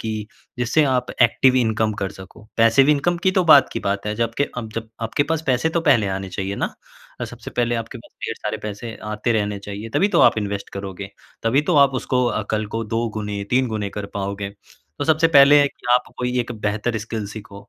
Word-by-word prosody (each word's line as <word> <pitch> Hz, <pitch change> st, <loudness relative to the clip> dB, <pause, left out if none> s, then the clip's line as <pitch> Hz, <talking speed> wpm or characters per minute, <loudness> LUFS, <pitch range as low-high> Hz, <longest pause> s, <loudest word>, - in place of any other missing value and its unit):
की 110 Hz, -, -3 dB, 0.5 s
जिससे 125 Hz, +6 st, +2 dB
आप 125 Hz, -2 st, +1 dB, 0.2 s
एक्टिव 125 Hz, +2 st, +4 dB
इनकम 110 Hz, -3 st, +1 dB
कर 95 Hz, -1 st, -2 dB
सको। 95 Hz, +2 st, -13 dB
पैसिव 115 Hz, +5 st, +5 dB
इनकम 150 Hz, +4 st, +2 dB
की 190 Hz, -, +5 dB
तो 185 Hz, -2 st, +2 dB
बाद 140 Hz, -, +8 dB
की -, -, -3 dB
बात 100 Hz, 0 st, -2 dB
है, 105 Hz, -, -1 dB
जबकि 115 Hz, +5 st, 0 dB
अब 110 Hz, -3 st, -5 dB
जब 115 Hz, -1 st, -4 dB
आपके 115 Hz, +5 st, 0 dB
पास 160 Hz, +1 st, -2 dB
पैसे 130 Hz, +4 st, +2 dB
तो -, -, +3 dB
पहले 125 Hz, -10 st, +3 dB
आने 95 Hz, 0 st, -5 dB
चाहिए 95 Hz, +2 st, -4 dB
ना? -, -, 0 dB, 0.5 s
और -, -, -2 dB
सबसे -, -, -10 dB
पहले 120 Hz, -1 st, 0 dB
आपके 115 Hz, +1 st, -5 dB
पास -, -, -17 dB
ढेर 115 Hz, -, -2 dB
सारे 105 Hz, +1 st, -3 dB
पैसे 105 Hz, +2 st, -6 dB, 0.2 s
आते 105 Hz, +3 st, 0 dB
रहने 105 Hz, -2 st, -1 dB
चाहिए, 100 Hz, +2 st, -7 dB
तभी 200 Hz, -, +3 dB
तो -, -, +5 dB
आप -, -, +5 dB
इन्वेस्ट 100 Hz, -1 st, -4 dB
करोगे, 100 Hz, 0 st, -6 dB, 0.3 s
तभी 120 Hz, +5 st, +3 dB
तो 170 Hz, -, +3 dB
आप 135 Hz, -1 st, -2 dB
उसको 125 Hz, -1 st, 0 dB
अ, 120 Hz, -, -1 dB
कल 110 Hz, -1 st, -1 dB
को 115 Hz, -, -1 dB
2 115 Hz, +2 st, -1 dB
गुने, 105 Hz, -1 st, -4 dB
3 130 Hz, +1 st, +3 dB
गुने 105 Hz, -3 st, -3 dB
कर 100 Hz, -, -4 dB
पाओगे। 100 Hz, 0 st, -3 dB, 0.5 s
तो -, -, -1 dB
सबसे 160 Hz, +1 st, +3 dB
पहले 145 Hz, +1 st, +7 dB
की 125 Hz, -, -16 dB
आप 125 Hz, -, 0 dB
कोई 125 Hz, 0 st, -1 dB
एक 120 Hz, 0 st, -4 dB
बेहतर 110 Hz, +2 st, -1 dB
स्किल 110 Hz, -1 st, -5 dB
सीखो 100 Hz, -1 st, -11 dB
115 Hz, 220 wpm, -21 LUFS, 105-125 Hz, 0.5 s, बाद